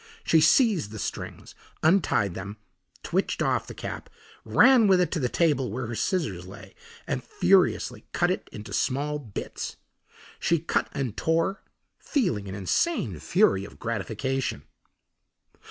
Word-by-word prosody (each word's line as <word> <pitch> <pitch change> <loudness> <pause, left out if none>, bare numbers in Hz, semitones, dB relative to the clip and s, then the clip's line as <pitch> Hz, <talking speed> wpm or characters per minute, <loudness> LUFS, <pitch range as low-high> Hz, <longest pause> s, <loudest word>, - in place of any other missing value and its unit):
She 160 - +4
seized 190 - +4
the 110 - -8
strings, - - -6 0.3
untied 155 - +3
them, 100 +3 -7 0.5
twitched - - -1
off - - 0
the - - -8
cap, - - -6 0.3
ran 235 - +6
with 190 -2 +5
it 180 -3 +1
to 170 - -1
the 125 -3 0
table 145 -7 +1
where 125 +3 -3
her 115 - -5
scissors 110 - -2
lay 95 - -12 0.3
and - - -3
furiously 195 - +2
cut - - +1
it - - -4
into 105 -1 -8
small 145 +7 0
bits. 110 -8 -6 0.6
She 170 - +2
cut 165 +2 -1
and 130 -7 -3
tore, 165 +4 0 0.4
feeling 115 - -1
an 95 - -5
insane 100 - 0
fury 95 +5 +3
of 100 - -11
gratification. 115 - -2
135 Hz, 140 wpm, -26 LUFS, 105-175 Hz, 0.6 s, ran